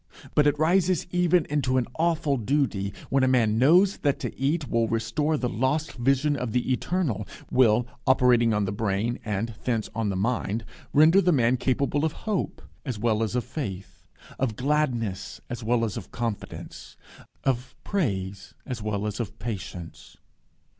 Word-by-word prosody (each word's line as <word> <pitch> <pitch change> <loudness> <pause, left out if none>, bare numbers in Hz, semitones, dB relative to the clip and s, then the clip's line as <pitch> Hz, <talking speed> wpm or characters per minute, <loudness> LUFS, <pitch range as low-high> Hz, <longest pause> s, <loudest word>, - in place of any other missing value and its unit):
But 150 0 +4
it 145 0 +2
rises 175 +2 +2
even 180 -1 +3
into 135 -3 0
an 125 - +2
awful 160 -4 +2
duty, 120 -5 0 0.2
when 135 -1 +3
a - - +4
man 115 -4 +3
knows 180 +9 +5
that 145 -2 +1
to - - -4
eat 145 +2 0
will 115 -1 +1
restore 115 +8 0
the 125 - -1
lost 130 +8 0
vision 135 +4 +2
of 125 -5 -3
the 125 +1 0
eternal; 125 - -1 0.2
will, 120 -2 +4 0.2
operating 125 -3 +4
on 105 -1 +1
the 95 - -2
brain, 105 +3 -1
and 110 +2 -2
thence 115 -4 -1
on 110 -1 -1
the 95 - -1
mind, 110 +1 -1 0.3
render 160 +6 +6
the 180 - +3
man 125 -4 +3
capable 140 +3 0
of 160 -1 +1
hope 210 -4 -2 0.2
as 125 -7 -4
well 110 0 +1
as 110 +1 -1
of 125 - +1
faith, 105 - -7 0.3
of 125 -5 0
gladness 125 -7 -1
as 120 -1 -5
well 115 +1 +2
as 105 - -4
of - - -8
confidence, 115 -3 -6 0.5
of 130 -1 -1
praise 100 - -2
as 125 -5 -5
well 105 -1 -2
as 105 +1 -3
of 115 -4 -4
patience. 95 -5 -7
125 Hz, 165 wpm, -26 LUFS, 110-145 Hz, 0.5 s, render